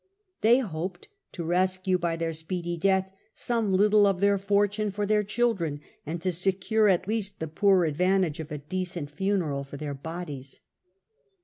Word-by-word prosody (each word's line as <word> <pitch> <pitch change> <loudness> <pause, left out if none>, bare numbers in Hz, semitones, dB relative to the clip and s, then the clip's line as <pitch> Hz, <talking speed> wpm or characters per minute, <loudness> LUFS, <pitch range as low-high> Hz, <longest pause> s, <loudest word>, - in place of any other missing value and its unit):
They 230 +3 +6
hoped 190 - -4 0.2
to 175 - -5
rescue 185 +2 +1
by 170 -1 0
their 165 0 -2
speedy 170 +2 -4
death 190 +2 +1 0.2
some 230 -4 -1
little 205 +2 +5
of 195 -2 +1
their 200 0 +3
fortune 205 +1 +1
for 205 +1 -2
their 210 0 +2
children, 200 -9 0 0.3
and 165 +3 -3
to 185 - +1
secure 195 +5 +1
at 185 -1 +2
least 210 -2 -2
the 160 - -3
poor 190 +3 +3
advantage 180 +1 +1
of 155 -2 -6
a 150 - -3
decent 170 0 -4
funeral 175 -6 -1
for 140 +1 -9
their 145 0 -4
bodies. 145 -2 -7
185 Hz, 165 wpm, -27 LUFS, 160-200 Hz, 0.3 s, They